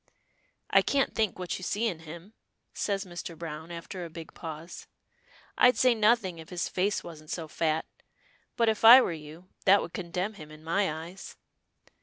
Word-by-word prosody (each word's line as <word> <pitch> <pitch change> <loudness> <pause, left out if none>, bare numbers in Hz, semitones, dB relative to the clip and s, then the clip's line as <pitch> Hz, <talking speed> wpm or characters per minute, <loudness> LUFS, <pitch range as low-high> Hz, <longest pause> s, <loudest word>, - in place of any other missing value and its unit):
"I - - +6
can't 275 -1 +1
think 220 -3 0
what 180 0 -4
you - - -10
see 210 +5 -1
in 180 -8 -1
him," 170 +6 -11 0.4
says 200 -1 -2
Mr. 175 -2 -7
Browne, 160 0 -7
after 175 +2 -7
a 170 - -7
big 165 0 -10
pause. 160 0 -8 0.7
"I'd 250 0 +6
say 255 -1 +5
nothing 215 -5 +2
if 160 - -11
his 180 -1 -2
face 200 +3 -1
wasn't 155 -3 -11
so 165 -2 -4
fat, 160 0 -1 0.7
but 230 - +2
if 220 0 0
I 235 +3 +11
were 255 - +1
you, 160 +3 -11 0.2
that 200 +1 +7
would - - -6
condemn 180 +3 -3
him 155 -7 -11
in 155 0 -13
my 180 +2 +1
eyes." 165 +5 -8
175 Hz, 180 wpm, -28 LUFS, 160-205 Hz, 0.7 s, I